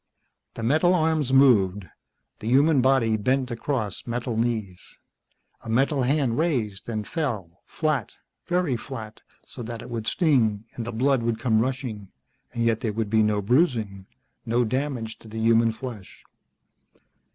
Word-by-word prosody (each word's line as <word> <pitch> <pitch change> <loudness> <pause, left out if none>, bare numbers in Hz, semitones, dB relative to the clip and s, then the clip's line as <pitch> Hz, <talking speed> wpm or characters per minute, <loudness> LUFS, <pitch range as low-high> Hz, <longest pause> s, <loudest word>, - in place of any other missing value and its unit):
The 115 - -6
metal 155 +9 +3
arms 155 -5 +1
moved. 105 -8 +4 0.5
The 110 - -6
human 140 +3 +4
body 120 -4 +3
bent 130 +4 0
across 115 -4 -3
metal 120 0 -3
knees. 110 -5 -3 0.6
A - - -8
metal 135 +4 +2
hand 130 -1 +1
raised 120 - -1
and 110 -2 -3
fell, 105 - -4
flat, 155 -8 -1 0.3
very 175 -7 +1
flat 115 -3 -8 0.2
so - - -10
that 115 0 -6
it 120 - -10
would 115 -2 -4
sting 115 - +2
and 115 - -5
the - - -3
blood 130 +3 +2
would 115 -1 -1
come 110 -2 +2
rushing, 125 -5 -3 0.4
and 115 -1 -1
yet 115 -1 +2
there 110 -2 -2
would 110 -1 -2
be 110 -1 +4
no 105 -1 +1
bruising, 110 - +1 0.4
no 120 +2 +1
damage 125 -2 -3
to - - -15
the 110 +1 -8
human 115 0 +4
flesh. 110 -4 -9
115 Hz, 150 wpm, -25 LUFS, 110-135 Hz, 0.6 s, moved